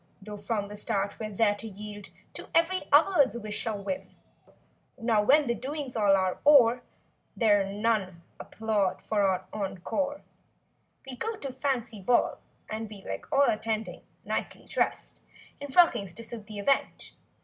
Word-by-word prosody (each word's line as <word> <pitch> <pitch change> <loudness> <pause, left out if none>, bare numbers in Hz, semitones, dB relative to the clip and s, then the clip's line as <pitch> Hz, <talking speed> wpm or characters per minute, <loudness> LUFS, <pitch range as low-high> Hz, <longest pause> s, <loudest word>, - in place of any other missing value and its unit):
Though 210 +1 -8
from 205 -1 -2
the 205 - -8
start 200 -2 -2
we're 215 -1 -4
there 210 0 +2
to 215 +2 -7
yield 205 0 -9 0.2
To - - -7
every 335 0 +2
other's 290 -4 +5
wish 215 -1 -4
or 215 -2 -1
whim. 280 +6 -4 0.9
Now 230 -3 +2
when 285 +8 +5
the 240 - +1
doings 265 +3 -5
all 205 -3 +4
are 185 -1 0
o'er 250 -5 +6 0.6
There're 205 -3 +4
none 200 -5 -1 0.2
applaud 215 -4 -1
for 205 -3 +2
an 185 - -6
encore. 215 +9 -3 0.8
We 260 - -6
go 450 - -3
to 275 -9 -6
fancy 250 -6 -2
ball 240 +5 +2 0.3
and 220 0 -5
we 205 -2 -11
Like 95 0 -6
all 280 +1 +5
attending—nicely 220 0 -3
dressed - - -2 0.4
In 285 - -6
frockings 265 - +3
to 230 - -7
suit 225 -2 -7
the 215 -1 -8
event. 270 +7 0
220 Hz, 150 wpm, -28 LUFS, 205-265 Hz, 0.9 s, o'er